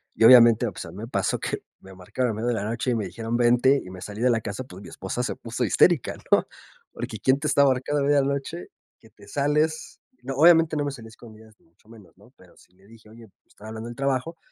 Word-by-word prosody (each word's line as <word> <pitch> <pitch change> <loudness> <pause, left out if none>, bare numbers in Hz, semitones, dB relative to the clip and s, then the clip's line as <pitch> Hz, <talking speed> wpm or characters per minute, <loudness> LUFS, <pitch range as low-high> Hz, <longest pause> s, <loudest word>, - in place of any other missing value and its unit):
y - - 0
obviamente, 120 -1 +7
pues - - -8
a 85 - -10
mí 90 - -13
me 110 +3 -7
pasó - - -1
que - - -4 0.2
me 95 - -14
marcaron 105 +7 -3
en 105 - -6
medio 115 +2 -3
de 120 - 0
la 100 - -3
noche 115 +4 -3
y 120 - +1
me 110 -3 -2
dijeron 115 +5 -4
vente, 125 +3 +3
y 90 - -10
me 90 -1 -10
salí 105 +2 -8
de 125 0 +3
la 115 -1 0
casa, 105 +3 -6
pues 95 -7 -13
mi - - -11
esposa 95 +6 -5
se 125 - -3
puso 120 +2 -5
histérica, 155 +5 +2 0.2
¿no? - - +4 0.4
Porque 110 - -7
quién 130 +6 +2
te 155 - -6
está 140 -1 +3
marcando 135 +2 0
a - - 0
media 145 0 +3
noche, 135 -10 -4 0.3
que - - -21
te - - -18
sales, 150 +2 -1 0.2
no, 135 +1 -5
obviamente 165 0 +5
no 145 -1 -1
me 145 - -2
salí 120 -5 -11
a - - -13
escondidas 110 -1 -16
ni - - -31
mucho 85 +5 -32
menos, 110 -4 -17
¿no? - - -21
Pero - - -21
sí - - -23
le 95 +2 -24
dije: 110 0 -18
"Oye, 115 +1 -15 0.2
pues - - -45
están 105 - -13
hablando 110 +1 -7
del 120 - -9
trabajo", 135 +5 -2
120 Hz, 265 wpm, -24 LUFS, 110-135 Hz, 0.4 s, obviamente